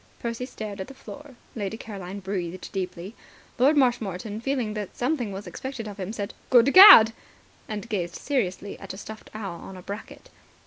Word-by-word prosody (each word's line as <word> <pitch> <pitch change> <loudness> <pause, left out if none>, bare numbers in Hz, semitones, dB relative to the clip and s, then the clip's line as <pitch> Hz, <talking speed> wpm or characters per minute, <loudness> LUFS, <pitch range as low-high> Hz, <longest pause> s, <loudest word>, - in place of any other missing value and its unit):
Percy 235 +1 -4
stared 210 -5 -7
at 190 - -6
the 270 - -12
floor. 290 0 -11 0.2
Lady 215 -1 -4
Caroline 200 -3 -8
breathed 185 -2 -5
deeply. 185 +1 -5 0.5
Lord 285 +5 +4
Marshmoreton, 220 -5 0
feeling 250 -4 -1
that 210 -3 -6
something 245 -4 -1
was 195 +1 -7
expected 260 -4 -6
of 205 -1 -9
him, 190 +1 -4
said 205 -2 -5 0.2
"Good 250 +2 +5
Gad!" 370 - +11 0.5
and 210 -1 -5
gazed 180 -6 -3
seriously 205 -8 -2
at 195 -1 -8
a - - -11
stuffed 215 +1 -10
owl 195 -6 -5
on 190 - -10
a 180 - -11
bracket. 205 +4 -9
215 Hz, 175 wpm, -25 LUFS, 195-245 Hz, 0.5 s, Gad